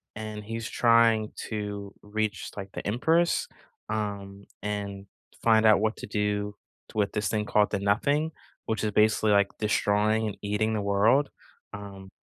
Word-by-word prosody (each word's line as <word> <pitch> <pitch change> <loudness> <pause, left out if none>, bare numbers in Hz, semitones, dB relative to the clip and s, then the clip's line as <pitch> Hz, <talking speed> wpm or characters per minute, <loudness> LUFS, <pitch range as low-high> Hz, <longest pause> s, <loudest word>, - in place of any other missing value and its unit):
and 110 -1 -6
he's 115 +1 -5
trying 115 -2 +4 0.2
to 105 -2 -5
reach, 105 -1 -3
like, 95 -1 -6
the - - -6
Empress, 160 +11 +2 0.4
um, 100 -2 -4 0.2
and 100 -1 -4 0.4
find 110 -1 +4
out 110 -2 +6
what 110 +1 0
to - - -7
do 105 0 -1 0.3
t - - -11
with 100 - +1
this 105 - -1
thing 105 -1 -1
called 105 0 +2
the 100 - 0
Nothing, 140 +11 +1 0.3
which 110 -1 -2
is 105 - 0
basically, 105 0 +3
like, 100 -1 +4
destroying 110 +1 +1
and 100 - -5
eating 105 +2 0
the 105 - -1
world. 105 +8 +3 0.4
Um, 100 -2 -9
105 Hz, 155 wpm, -27 LUFS, 100-110 Hz, 0.4 s, out